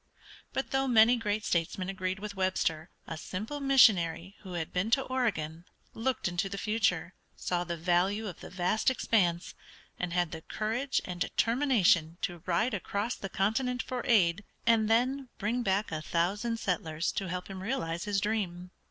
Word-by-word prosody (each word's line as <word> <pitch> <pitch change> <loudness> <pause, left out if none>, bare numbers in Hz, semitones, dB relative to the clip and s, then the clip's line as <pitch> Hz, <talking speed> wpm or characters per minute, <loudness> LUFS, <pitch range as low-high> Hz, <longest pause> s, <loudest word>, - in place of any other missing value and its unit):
But 265 - -3
though 270 0 +1
many 235 0 +6
great 215 -2 -2
statesmen 175 +2 0
agreed 185 0 -2
with 205 +1 -6
Webster 180 -4 0 0.2
a 165 - -6
simple 220 - -5
missionary 200 - +4
who 190 -3 -9
had 165 -2 -4
been 185 +4 0
to 265 +3 +3
Oregon 180 -12 -2 0.3
looked 245 0 -1
into 175 +2 -1
the 200 - -5
future, 195 -5 0 0.2
saw 175 -1 -1
the 170 -1 -4
value 180 +6 +1
of 180 - -7
the - - -9
vast 185 +6 +1
expanse, 180 -9 +1 0.5
and 180 -1 -2
had 175 -2 +1
the 160 - -6
courage 230 +10 -1
and 180 -1 -6
determination 220 - +2
to 175 -2 -3
ride 215 +7 +1
across 205 +4 -2
the 195 - -6
continent 245 +7 0
for 255 -1 -3
aid, 200 -5 +4 0.2
and 225 -2 +4
then 255 +3 +2
bring 230 +5 -1
back 200 -1 0
a 155 -1 -3
thousand 205 +9 0
settlers 170 -5 -1
to 195 -2 -3
help 180 +1 -4
him 190 -1 -7
realize 185 -6 -2
his 205 -1 +1
dream. 190 -4 -2
195 Hz, 170 wpm, -30 LUFS, 175-230 Hz, 0.5 s, many